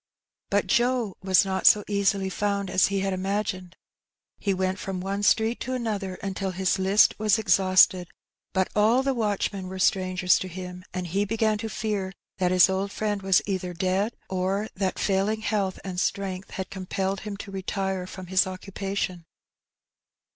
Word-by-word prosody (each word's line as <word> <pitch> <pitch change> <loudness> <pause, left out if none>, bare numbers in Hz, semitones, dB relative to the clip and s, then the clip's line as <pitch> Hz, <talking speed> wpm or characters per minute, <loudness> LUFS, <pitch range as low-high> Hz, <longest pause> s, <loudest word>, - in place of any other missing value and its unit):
Bat 200 0 +2
Joe 240 0 +1
was 190 +1 +4
not 190 0 +1
so 210 - +6
easily 200 -1 +1
found 200 -1 -1
as 185 - +4
he 195 0 -1
had 195 0 -1
imagined. 185 -1 -3 0.6
He 200 - 0
went 190 0 -1
from 190 -1 -4
one 195 +2 -3
street 220 +3 +2
to 255 - -4
another 210 -6 -3
until 195 0 -2
his 190 +1 0
list 195 +3 +5
was 215 0 +3
exhausted; 185 -3 +4 0.4
but 190 0 +1
all 225 +5 +4
the 270 0 +1
watch 210 -4 -1
men 190 -2 -6
were 190 +1 -6
strangers 185 -1 +2
to 185 - -4
him, 180 0 -8
and 185 -1 -4
he 195 +4 0
began 215 0 0
to 225 0 -4
fear 200 -3 -3 0.3
that 180 -1 +2
his 185 0 +6
old 190 +1 -2
friend 205 -1 -2
was 190 -1 +3
either 185 -3 -3
dead, 190 +6 0
or 190 +3 -1
that 190 -2 -2
failing 200 +2 0
health 205 -3 -1
and 185 -2 -4
strength 190 -1 -2
had 190 - -6
compelled 190 +1 -2
him 210 -2 -6
to 200 0 -8
retire 190 -1 -3
from 185 0 -8
his 185 0 +2
occupation. 190 -2 -4
195 Hz, 170 wpm, -26 LUFS, 185-205 Hz, 0.6 s, so